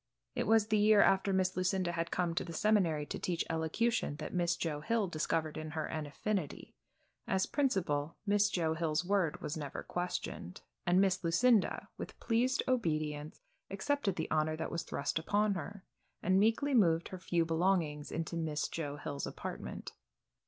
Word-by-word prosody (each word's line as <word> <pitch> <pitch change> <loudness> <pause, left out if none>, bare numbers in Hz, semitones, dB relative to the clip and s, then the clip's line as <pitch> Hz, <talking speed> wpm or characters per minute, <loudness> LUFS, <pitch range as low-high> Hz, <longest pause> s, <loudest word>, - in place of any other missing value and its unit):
It - - -1
was 220 -1 +4
the 215 -1 +3
year 210 0 +6
after 195 0 +3
Miss 185 -1 +1
Lucinda 185 -1 +1
had 170 0 -2
come 175 -2 0
to 170 - -1
the 170 - -7
seminary 175 -6 +2
to - - -5
teach 175 -2 -1
elocution 165 +4 0
that 150 +1 -6
Miss 175 -1 +1
Joe 155 -4 -2
Hill 220 +4 +1
discovered 155 -1 -1
in 155 0 -5
her 155 - 0
an 155 -2 -4
affinity. 185 +2 -3 0.5
As 190 0 +2
principal, 170 - 0
Miss 205 0 +3
Joe 165 -5 0
Hill's 160 0 0
word 185 -5 +1
was 150 - -3
never 145 -3 -5
questioned, 175 - -4 0.3
and 175 +1 +5
Miss 190 -2 +2
Lucinda, 205 +6 +3
with - - -7
pleased 250 +3 +1
obedience, 155 - -1 0.3
accepted 200 0 0
the 160 - -3
honor 155 0 +1
that 160 - -4
was 170 - -2
thrust 140 +3 -2
upon 205 +5 +1
her, 200 +1 -6 0.4
and 185 +2 +4
meekly 225 +7 +2
moved 170 -8 +3
her 185 - -7
few 170 -2 +1
belongings 165 -3 0
into 165 +1 -3
Miss 155 -2 -1
Joe 145 -3 -4
Hill's 145 -1 -4
apartment. - - -6
175 Hz, 170 wpm, -33 LUFS, 155-205 Hz, 0.5 s, year